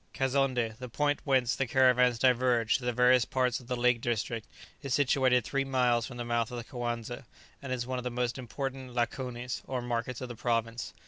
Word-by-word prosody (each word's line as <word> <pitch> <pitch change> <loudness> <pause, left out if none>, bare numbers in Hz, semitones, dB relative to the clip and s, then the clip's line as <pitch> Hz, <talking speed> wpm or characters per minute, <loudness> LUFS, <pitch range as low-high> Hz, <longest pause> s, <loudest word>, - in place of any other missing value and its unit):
Kazonndé, 130 -4 +1
the 125 -1 -7
point 145 +4 0
whence 130 -3 +2
the 135 - -1
caravans 125 -2 +4
diverge 125 -2 +3
to 125 - -8
the 125 - +1
various 125 +1 +5
parts 125 0 0
of 125 - -15
the 125 - -1
lake 120 -1 +2
district, 115 -1 -2 0.3
is 140 -3 -1
situated 130 -3 +3
three 140 +4 -1
miles 125 -3 +1
from 120 - -9
the 120 - -4
mouth 120 -1 0
of 125 - -6
the 120 - -5
Coanza, 120 0 -4 0.4
and 135 -2 -6
is 125 -2 -2
one 130 0 -3
of - - -6
the 125 - -2
most 125 +1 -2
important 130 +1 -5
lakonis, 125 0 -2
or 130 -1 -2
markets 120 0 -3
of 130 - -5
the 120 - -7
province. 115 -5 -2
125 Hz, 205 wpm, -30 LUFS, 120-130 Hz, 0.4 s, various